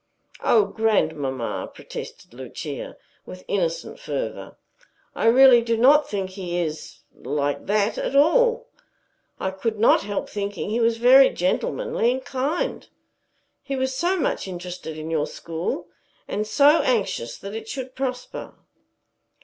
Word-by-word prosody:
"O 220 Hz, -3 st, +4 dB
grandmamma!" 155 Hz, -, -1 dB
protested -, -, -9 dB
Lucia, 130 Hz, +3 st, -7 dB, 0.3 s
with 185 Hz, 0 st, -10 dB
innocent 190 Hz, -, -2 dB
fervor. -, -, -5 dB, 0.6 s
"I -, -, 0 dB
really 250 Hz, 0 st, +7 dB
do 230 Hz, -1 st, 0 dB
not 285 Hz, +6 st, +5 dB
think 195 Hz, -2 st, -3 dB
he 180 Hz, -2 st, -4 dB
is 160 Hz, -3 st, -4 dB
like 145 Hz, +1 st, -3 dB
that 205 Hz, +1 st, +1 dB
at -, -, -2 dB
all. 475 Hz, -, +4 dB, 0.7 s
I 190 Hz, -, -2 dB
could 215 Hz, +3 st, -3 dB
not 225 Hz, -, +5 dB
help 205 Hz, 0 st, -3 dB
thinking 205 Hz, 0 st, -4 dB
he 230 Hz, -, 0 dB
was 230 Hz, 0 st, +2 dB
very 260 Hz, +3 st, +7 dB
gentlemanly 475 Hz, -, 0 dB
and 260 Hz, 0 st, -6 dB
kind. 275 Hz, +6 st, -2 dB, 0.7 s
He 275 Hz, -, -4 dB
is 260 Hz, 0 st, -1 dB
so 355 Hz, +7 st, 0 dB
much 290 Hz, -, -1 dB
interested 175 Hz, -3 st, -7 dB
in 155 Hz, +1 st, -6 dB
your 155 Hz, -2 st, 0 dB
school, 170 Hz, +1 st, -4 dB, 0.4 s
and 210 Hz, +1 st, -2 dB
so 290 Hz, +8 st, +5 dB
anxious 200 Hz, -, -1 dB
that 200 Hz, +1 st, -8 dB
it 220 Hz, 0 st, -7 dB
should 260 Hz, -1 st, -6 dB
prosper." 255 Hz, -2 st, -5 dB
215 Hz, 135 wpm, -23 LUFS, 175-265 Hz, 0.7 s, really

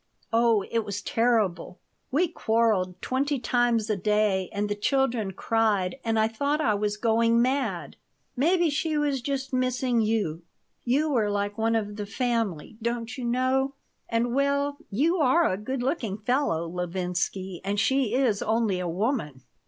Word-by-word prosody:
Oh, 230 Hz, -3 st, +4 dB
it 230 Hz, -, +2 dB
was 200 Hz, -1 st, -4 dB
terrible! 220 Hz, -8 st, 0 dB, 0.3 s
We 325 Hz, +7 st, +2 dB
quarreled 220 Hz, -, +1 dB
twenty 280 Hz, +3 st, 0 dB
times 240 Hz, -2 st, +1 dB
a 215 Hz, -, +1 dB
day 200 Hz, -1 st, +1 dB
and 205 Hz, +1 st, -1 dB
the 205 Hz, -, -1 dB
children 230 Hz, -1 st, 0 dB
cried 215 Hz, 0 st, 0 dB
and 225 Hz, -1 st, 0 dB
I 220 Hz, 0 st, +3 dB
thought 280 Hz, +7 st, -1 dB
I 225 Hz, -9 st, +2 dB
was 210 Hz, 0 st, -1 dB
going 230 Hz, +1 st, +3 dB
mad. 265 Hz, +3 st, -1 dB, 0.4 s
Maybe 335 Hz, +4 st, +2 dB
she 310 Hz, +1 st, -1 dB
was 285 Hz, -3 st, 0 dB
just 270 Hz, 0 st, -3 dB
missing 255 Hz, -1 st, +1 dB
you. 210 Hz, -7 st, 0 dB, 0.4 s
You 290 Hz, +5 st, +1 dB
were 220 Hz, -6 st, +2 dB
like 205 Hz, 0 st, -1 dB
one 225 Hz, +1 st, +1 dB
of 210 Hz, -2 st, -2 dB
the 205 Hz, -1 st, -4 dB
family, 225 Hz, -, -2 dB
don't 235 Hz, 0 st, -3 dB
you 255 Hz, -3 st, -5 dB
know. 260 Hz, +3 st, +1 dB, 0.3 s
And, 235 Hz, +1 st, 0 dB
well, 280 Hz, +1 st, +1 dB
you 310 Hz, -, +1 dB
are 310 Hz, +2 st, +4 dB
a -, -, 0 dB
good 245 Hz, +6 st, -4 dB
looking 245 Hz, -, -1 dB
fellow, 215 Hz, -, 0 dB
Levinsky, 180 Hz, +1 st, -3 dB
and 200 Hz, +1 st, -1 dB
she 250 Hz, 0 st, +2 dB
is 245 Hz, -6 st, +2 dB
only 220 Hz, -4 st, +1 dB
a 180 Hz, -, -2 dB
woman." 170 Hz, -, -2 dB
230 Hz, 160 wpm, -26 LUFS, 205-265 Hz, 0.4 s, Oh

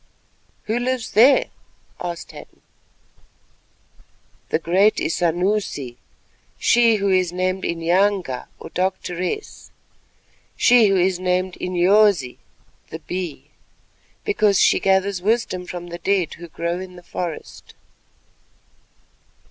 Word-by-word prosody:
"Who 225 Hz, +3 st, -1 dB
lives 250 Hz, -2 st, -2 dB
there?" 275 Hz, -, +5 dB, 0.5 s
asked 175 Hz, -1 st, -6 dB
Hadden. -, -, -14 dB, 1.9 s
"The -, -, +2 dB
great 185 Hz, +6 st, +3 dB
Isanusi—she 175 Hz, -, -1 dB, 1.0 s
who 200 Hz, -1 st, 0 dB
is 185 Hz, -2 st, +2 dB
named 185 Hz, +1 st, -2 dB
Inyanga 170 Hz, -3 st, 0 dB
or -, -, -10 dB
Doctoress; 185 Hz, -, -3 dB, 0.9 s
she 240 Hz, -3 st, +5 dB
who 195 Hz, -1 st, +2 dB
is 185 Hz, 0 st, +1 dB
named 185 Hz, 0 st, -1 dB
Inyosi 180 Hz, -5 st, +2 dB, 0.5 s
(the -, -, -6 dB
Bee), 175 Hz, -2 st, -6 dB, 0.7 s
because 215 Hz, -, +2 dB
she -, -, +4 dB
gathers 190 Hz, -1 st, +1 dB
wisdom 195 Hz, -3 st, -1 dB
from 175 Hz, -1 st, -7 dB
the 170 Hz, 0 st, -7 dB
dead 190 Hz, -2 st, 0 dB
who 170 Hz, +1 st, -10 dB
grow 170 Hz, +2 st, -3 dB
in 185 Hz, -1 st, -9 dB
the 175 Hz, -, -13 dB
forest." 175 Hz, -2 st, -7 dB
185 Hz, 100 wpm, -21 LUFS, 175-200 Hz, 1.9 s, there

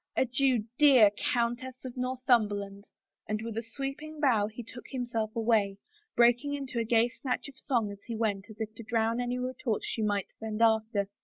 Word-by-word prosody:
Adieu, 255 Hz, -2 st, +2 dB, 0.2 s
dear 260 Hz, -8 st, +7 dB
Countess 240 Hz, +4 st, -1 dB
of 255 Hz, -, -6 dB
Northumberland," 220 Hz, -6 st, 0 dB, 0.4 s
and 215 Hz, 0 st, 0 dB
with 230 Hz, -1 st, -5 dB
a 225 Hz, -, -1 dB
sweeping 275 Hz, +6 st, -6 dB
bow 235 Hz, -8 st, +3 dB
he 225 Hz, +3 st, -8 dB
took 230 Hz, +2 st, -11 dB
himself 235 Hz, -4 st, -3 dB
away, 220 Hz, -4 st, +2 dB, 0.4 s
breaking 245 Hz, +4 st, +4 dB
into 270 Hz, -4 st, -4 dB
a -, -, +1 dB
gay 230 Hz, +1 st, +3 dB
snatch 250 Hz, +2 st, -3 dB
of 275 Hz, -, -12 dB
song 235 Hz, -7 st, 0 dB
as 200 Hz, 0 st, -10 dB
he 230 Hz, -, -3 dB
went 210 Hz, -3 st, -1 dB
as 220 Hz, -, -12 dB
if 220 Hz, -1 st, -4 dB
to 225 Hz, -, -10 dB
drown 230 Hz, +1 st, 0 dB
any 245 Hz, 0 st, -1 dB
retort 250 Hz, -2 st, -2 dB
she 225 Hz, -, -3 dB
might 205 Hz, -2 st, 0 dB
send 220 Hz, -1 st, -4 dB
after. 220 Hz, -3 st, +3 dB
230 Hz, 180 wpm, -30 LUFS, 215-255 Hz, 0.4 s, dear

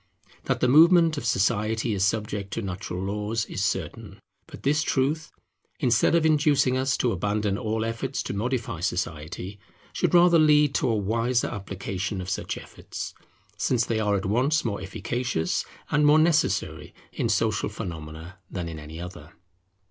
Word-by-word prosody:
That -, -, -1 dB
the 125 Hz, -, +4 dB
movement 165 Hz, +4 st, +6 dB
of 120 Hz, -, -4 dB
society 110 Hz, +2 st, +1 dB
is 95 Hz, -2 st, 0 dB
subject 105 Hz, -1 st, -1 dB
to 115 Hz, -, -3 dB
natural 90 Hz, -1 st, -4 dB
laws 105 Hz, +3 st, -2 dB
is -, -, -4 dB
certain; -, -, -3 dB, 0.3 s
but -, -, -12 dB
this 150 Hz, +3 st, +2 dB
truth, 150 Hz, +2 st, 0 dB, 0.5 s
instead 120 Hz, +6 st, +3 dB
of 165 Hz, -1 st, +3 dB
inducing 145 Hz, -4 st, +3 dB
us 130 Hz, +1 st, +1 dB
to 125 Hz, -, +1 dB
abandon 105 Hz, +1 st, -1 dB
all 110 Hz, 0 st, -2 dB
efforts 115 Hz, +4 st, -3 dB
to -, -, -4 dB
modify 115 Hz, -3 st, -2 dB
society, 90 Hz, +2 st, -4 dB, 0.3 s
should -, -, +1 dB
rather 175 Hz, -1 st, +6 dB
lead 150 Hz, -2 st, +5 dB
to -, -, +1 dB
a 115 Hz, -, +2 dB
wiser 115 Hz, +4 st, 0 dB
application 95 Hz, 0 st, -4 dB
of 90 Hz, 0 st, -4 dB
such -, -, -3 dB
efforts, -, -, -8 dB, 0.4 s
since 120 Hz, -2 st, +1 dB
they 115 Hz, -1 st, -1 dB
are 105 Hz, -1 st, +1 dB
at 95 Hz, -, -2 dB
once 130 Hz, +10 st, +1 dB
more 100 Hz, -4 st, -2 dB
efficacious, 110 Hz, -1 st, -2 dB, 0.3 s
and 150 Hz, 0 st, +3 dB
more 150 Hz, +1 st, +6 dB
necessary 155 Hz, 0 st, +1 dB, 0.2 s
in -, -, -1 dB
social -, -, +1 dB
phenomena 80 Hz, +1 st, -8 dB
than 90 Hz, -3 st, -4 dB
in 80 Hz, -2 st, -6 dB
any 75 Hz, +2 st, -9 dB
other. 85 Hz, -3 st, -9 dB
110 Hz, 160 wpm, -26 LUFS, 95-135 Hz, 0.5 s, movement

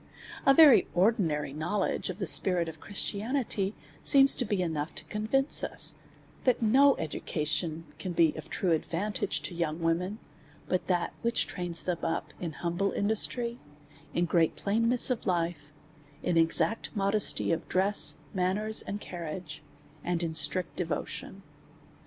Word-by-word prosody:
A 275 Hz, -, +8 dB
very 305 Hz, -4 st, +7 dB
ordinary 175 Hz, -, +1 dB
knowledge 175 Hz, +8 st, -2 dB
of 185 Hz, -, -5 dB
the 195 Hz, -, -3 dB
spirit 175 Hz, 0 st, +3 dB
of 160 Hz, -, -8 dB
Christi 205 Hz, 0 st, -2 dB
anity, 220 Hz, -5 st, -1 dB, 0.3 s
seems 275 Hz, 0 st, +6 dB
to 250 Hz, -, +1 dB
be 205 Hz, -2 st, -1 dB
enough 160 Hz, -2 st, -3 dB
to -, -, -1 dB
convince 245 Hz, +7 st, +1 dB
us, -, -, 0 dB, 0.5 s
that 255 Hz, -2 st, +2 dB
no 265 Hz, +5 st, +5 dB
edu 160 Hz, -2 st, -5 dB
cation 160 Hz, +1 st, -2 dB
can 185 Hz, -, -4 dB
be 165 Hz, -2 st, +3 dB
of -, -, -9 dB
true 185 Hz, -, -1 dB
advantage 175 Hz, +5 st, -1 dB
to -, -, -4 dB
young 165 Hz, -2 st, -2 dB
women, 170 Hz, +5 st, -1 dB, 0.5 s
but 185 Hz, -, -1 dB
that 175 Hz, -2 st, 0 dB
which 235 Hz, 0 st, +2 dB
trains 175 Hz, -3 st, -1 dB
them 175 Hz, -2 st, -2 dB
up 165 Hz, -, -3 dB
in 170 Hz, -3 st, -4 dB
humble 175 Hz, +5 st, -2 dB
industry, 235 Hz, +3 st, -1 dB, 0.6 s
in 175 Hz, -, +2 dB
great 165 Hz, -1 st, +2 dB
plainness 230 Hz, +5 st, +2 dB
of 245 Hz, -, -3 dB
life, 165 Hz, -4 st, -2 dB, 0.5 s
in 180 Hz, -, 0 dB
exact 165 Hz, +7 st, +2 dB
modesty 200 Hz, -1 st, +2 dB
of 165 Hz, 0 st, -2 dB
dress, 195 Hz, +3 st, +2 dB, 0.2 s
manners, 200 Hz, +4 st, +2 dB
and 205 Hz, -, -5 dB
carriage, 170 Hz, -3 st, -7 dB, 0.4 s
and 175 Hz, -1 st, -1 dB
in 165 Hz, -1 st, -2 dB
strict 160 Hz, +3 st, +1 dB
devotion. -, -, -4 dB
185 Hz, 150 wpm, -29 LUFS, 165-215 Hz, 0.6 s, A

